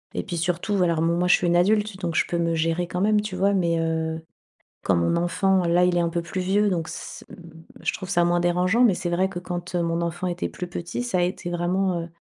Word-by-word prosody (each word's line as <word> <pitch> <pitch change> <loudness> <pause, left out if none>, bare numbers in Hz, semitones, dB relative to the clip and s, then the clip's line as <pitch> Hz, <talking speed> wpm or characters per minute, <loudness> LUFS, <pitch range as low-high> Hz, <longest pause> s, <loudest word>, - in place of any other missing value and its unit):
et - - -2
puis 175 - -5
surtout, 180 +4 -1
alors 170 -2 +2
bon, 165 +1 +1
moi 180 - +1
je 180 - +7
suis - - -2
une 175 0 +2
adulte 205 +3 +2
donc 170 -3 -2
je - - +3
peux 170 - -2
me 165 -1 0
gérer 165 +2 0
quand 180 - -3
même, 210 +1 +3
tu 210 -3 -5
vois? 195 +2 +2
Mais, 170 -3 +1
heu, 160 0 -1 0.7
quand - - +2
mon 85 - +1
enfant, 180 +2 +1
là 175 +1 +3
il 180 -1 +1
est - - +3
un 170 - 0
peu 170 - -1
plus 175 +2 -4
vieux 205 +3 +2
donc 170 -4 -1
c - - -8
mmh, - - -9 0.5
je - - 0
trouve 185 - -6
ça 175 -2 +3
moins 175 0 +2
dérangeant 180 +6 +2
mais 210 - +5
c'est 175 0 -3
vrai 185 +2 +1
que 185 - -5
quand 175 0 -6
mon 170 -1 0
enfant 170 +2 -3
était 175 -1 -2
plus 180 - -6
petit 175 +6 -5
ça 240 -7 -1
a - - +2
été 175 0 -2
vraiment, 175 +1 0
heu, 165 - -7
175 Hz, 265 wpm, -24 LUFS, 170-185 Hz, 0.7 s, je